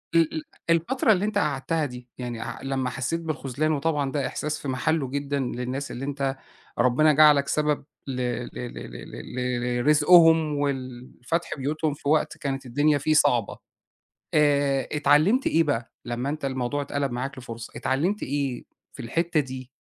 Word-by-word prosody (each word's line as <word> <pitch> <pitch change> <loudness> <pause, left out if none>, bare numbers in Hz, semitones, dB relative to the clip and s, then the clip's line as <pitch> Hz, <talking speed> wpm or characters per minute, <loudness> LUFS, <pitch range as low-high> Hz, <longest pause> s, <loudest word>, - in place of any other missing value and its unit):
ال 165 -2 +4
ال 155 - -3 0.3
الفترة 170 +9 +3
اللي 200 -1 +2
أنت 210 -1 -1
قعدتها 150 0 0
دي 125 -2 -8
يعني 120 -2 -5
أع - - -6
لمّا 135 -2 -1
حسّيت 135 +7 -2
بالخُذلان 155 -1 -2
وطبعًا 145 -2 0
ده 140 -2 -1
إحساس 155 +1 -3
في 140 - -6
محله 135 +1 0
جدًا 140 0 -2
للناس 125 +2 -3
اللي 135 +3 -5
أنت 135 -1 -2 0.4
ربنا 130 +5 +4
جعلك 150 -2 +6
سبب 150 -1 0 0.2
ل - - -2
ل 125 -1 -2
ل 125 -1 -6
ل - - -9
ل - - -9 0.3
ل 120 0 -1
لرزقهم، 160 +1 +6
ولفتح 130 +3 -3
بيوتهم 150 +2 -1
في 145 -1 -4
وقت 155 0 +2
كانت 135 -1 -3
الدنيا 145 +4 +2
فيه 155 +3 +1
صعبة. 120 -7 +2 0.8
آآ، 140 -2 +3
اتعلمت 155 - +3
إيه 165 +1 +4
بقى 120 -6 -2
لمّا 120 +2 -3
أنت 150 0 -4
الموضوع 130 +2 -1
إتقلب 140 -2 -2
معاك 130 +3 -4
لفرصة؟ 115 -2 -8
اتعلمت 170 +11 0
إيه 140 -3 -2 0.3
في 130 - -9
الحتة 165 +6 0
دي؟ 130 -2 -7
140 Hz, 165 wpm, -25 LUFS, 130-155 Hz, 0.8 s, جعلك